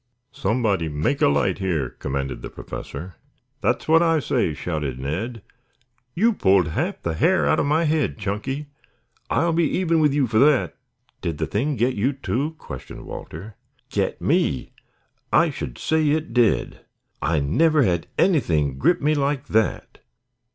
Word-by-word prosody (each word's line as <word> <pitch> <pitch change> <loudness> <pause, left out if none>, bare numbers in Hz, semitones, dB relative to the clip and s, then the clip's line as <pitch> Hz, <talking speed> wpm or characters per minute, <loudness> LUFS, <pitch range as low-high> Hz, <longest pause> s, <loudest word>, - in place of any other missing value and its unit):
"Somebody 100 -6 0
make 75 - -1
a - - +6
light 70 0 +1
here," 85 -9 -1
commanded 70 0 -4
the - - -6
Professor. 80 +3 -8 0.4
"That's - - 0
what 160 +1 +5
I 165 -2 +3
say," 85 - 0
shouted 75 -6 -3
Ned. 95 - -4 0.7
"You 225 +6 +3
pulled 95 - +3
half - - -2
the 85 - -1
hair 180 - +2
out - - +3
of - - +1
my 155 +3 +2
head, 155 -6 0
Chunky. 110 +8 -3 0.6
I'll 170 0 +2
be 165 0 +2
even 170 -3 +2
with 150 -2 +4
you 140 -1 +2
for 110 -2 +1
that." 145 -1 +3 0.5
"Did 85 -3 -3
the 80 - -1
Thing 135 - -1
get 125 +2 +1
you, 125 +7 0
too?" 140 +3 -2
questioned 65 - -9
Walter. 100 +8 -9 0.3
"Get - - -1
me? 65 - 0 0.6
I - - +4
should - - -6
say 155 -1 +1
it 155 -3 -1
did. 120 -3 +2 0.4
I 80 +1 +1
never 150 - +3
had 85 -6 0
anything 80 - +2
grip 175 - +3
me 150 +1 +3
like 140 -1 -1
that." 110 0 0
115 Hz, 160 wpm, -23 LUFS, -, 0.7 s, a